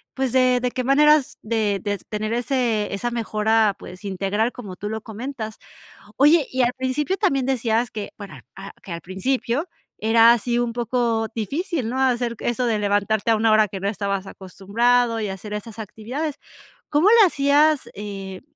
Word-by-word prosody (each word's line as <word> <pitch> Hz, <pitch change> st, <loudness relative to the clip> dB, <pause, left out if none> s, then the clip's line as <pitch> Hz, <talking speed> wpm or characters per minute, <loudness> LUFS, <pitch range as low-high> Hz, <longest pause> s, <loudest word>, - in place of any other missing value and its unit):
pues, 265 Hz, -2 st, -1 dB
de 255 Hz, -1 st, +4 dB
de 250 Hz, -, 0 dB
qué 255 Hz, -, -3 dB
maneras 295 Hz, +2 st, +4 dB
de 215 Hz, -3 st, 0 dB
de 205 Hz, -1 st, -1 dB
tener 215 Hz, +1 st, -5 dB
ese 240 Hz, -4 st, 0 dB
esa 220 Hz, +5 st, -2 dB
mejora, 220 Hz, -2 st, +1 dB
pues, 185 Hz, +3 st, -11 dB
integral 200 Hz, +4 st, -1 dB
como 205 Hz, -8 st, -9 dB
tú 205 Hz, +3 st, -6 dB
lo 220 Hz, 0 st, -4 dB
comentas. 220 Hz, 0 st, -6 dB, 0.6 s
Oye, 295 Hz, +1 st, +5 dB
y 260 Hz, -, -2 dB
al 245 Hz, +1 st, +2 dB
principio 265 Hz, +8 st, -1 dB
también 275 Hz, -, +1 dB
decías 240 Hz, -2 st, 0 dB
que, 210 Hz, -2 st, -6 dB
para 200 Hz, -2 st, -11 dB
a 195 Hz, +1 st, -9 dB
que 185 Hz, -, -8 dB
al 170 Hz, -, -5 dB
principio 240 Hz, -, -2 dB, 0.3 s
era 225 Hz, +1 st, +6 dB
así 240 Hz, +1 st, -1 dB
un 240 Hz, -1 st, 0 dB
poco 235 Hz, -2 st, 0 dB
difícil, 275 Hz, -, -2 dB
¿no? 260 Hz, -, -3 dB
Hacer 245 Hz, -3 st, 0 dB
eso 245 Hz, +1 st, -1 dB
de 225 Hz, -2 st, +1 dB
levantarte 205 Hz, +2 st, +1 dB
a 220 Hz, -, +3 dB
1 220 Hz, +1 st, +2 dB
hora 215 Hz, 0 st, +5 dB
que 195 Hz, 0 st, -7 dB
no 200 Hz, -, -1 dB
estabas 200 Hz, -1 st, -2 dB
acostumbrado 225 Hz, +6 st, 0 dB
y 210 Hz, -, -2 dB
hacer 195 Hz, +2 st, -6 dB
esas 210 Hz, +1 st, -7 dB
actividades. 245 Hz, +8 st, -5 dB, 0.6 s
¿Cómo 305 Hz, +6 st, +4 dB
le 455 Hz, -3 st, +7 dB
hacías, 295 Hz, -1 st, +2 dB
eh, 195 Hz, -2 st, -7 dB
230 Hz, 175 wpm, -22 LUFS, 210-255 Hz, 0.6 s, le